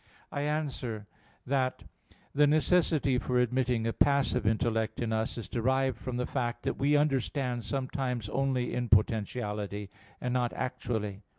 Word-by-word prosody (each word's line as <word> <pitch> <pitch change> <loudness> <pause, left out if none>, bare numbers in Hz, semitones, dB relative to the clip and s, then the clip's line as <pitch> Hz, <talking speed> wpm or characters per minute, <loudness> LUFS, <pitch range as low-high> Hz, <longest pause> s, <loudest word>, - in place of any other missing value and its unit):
I 145 - -2
answer 140 -8 -2 0.4
that, 130 -1 0 0.5
The 145 +1 +5
necessity 155 -3 +3
for 125 0 0
admitting 125 -1 +1
a 115 - 0
passive 140 -5 +2
intellect 110 -1 +1
in 115 -2 -1
us 110 +2 -1
is 115 - -5
derived 130 +2 +1
from 125 -1 -4
the 125 - 0
fact 120 -3 -2
that - - -2
we 145 +2 +3
understand 135 -4 0
sometimes 130 -4 -2
only 130 -1 0
in 125 -1 -2
potentiality, 105 -2 0 0.3
and 125 -1 -2
not 125 -1 +1
actually. 110 -6 -3
125 Hz, 140 wpm, -30 LUFS, 115-135 Hz, 0.5 s, The